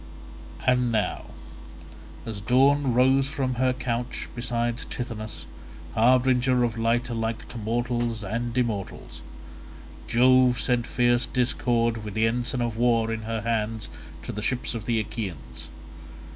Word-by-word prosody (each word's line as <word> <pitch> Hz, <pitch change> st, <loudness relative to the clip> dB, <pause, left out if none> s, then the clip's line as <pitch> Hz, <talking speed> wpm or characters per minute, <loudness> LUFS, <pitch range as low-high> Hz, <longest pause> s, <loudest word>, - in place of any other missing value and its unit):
And 125 Hz, -1 st, +3 dB
now 110 Hz, -2 st, -1 dB, 1.0 s
as 110 Hz, -3 st, -5 dB
Dawn 135 Hz, +3 st, +3 dB
rose 130 Hz, +2 st, +4 dB
from 135 Hz, -3 st, -2 dB
her 130 Hz, 0 st, +4 dB
couch 125 Hz, -1 st, -3 dB
beside 120 Hz, 0 st, -2 dB
Tithonus, 110 Hz, -3 st, -5 dB, 0.5 s
harbinger 125 Hz, +1 st, +3 dB
of 115 Hz, -3 st, 0 dB
light 115 Hz, +1 st, +1 dB
alike 115 Hz, -1 st, -3 dB
to 120 Hz, -, -7 dB
mortals 120 Hz, 0 st, -1 dB
and 115 Hz, +4 st, -3 dB
immortals, 110 Hz, -6 st, -3 dB, 0.9 s
Jove 125 Hz, 0 st, +4 dB
sent 120 Hz, -2 st, 0 dB
fierce 120 Hz, 0 st, +2 dB
Discord 115 Hz, -2 st, 0 dB
with 105 Hz, -2 st, -6 dB
the 110 Hz, 0 st, +3 dB
ensign 120 Hz, +2 st, 0 dB
of 115 Hz, -2 st, -3 dB
war 115 Hz, -1 st, +2 dB
in 110 Hz, -, -4 dB
her 115 Hz, -1 st, -1 dB
hands 110 Hz, 0 st, -2 dB, 0.3 s
to -, -, -5 dB
the 105 Hz, -, -5 dB
ships 120 Hz, +3 st, -1 dB
of 115 Hz, -2 st, -5 dB
the 115 Hz, -2 st, +1 dB
Achaeans. 85 Hz, -, -6 dB
120 Hz, 130 wpm, -26 LUFS, 115-125 Hz, 1.0 s, rose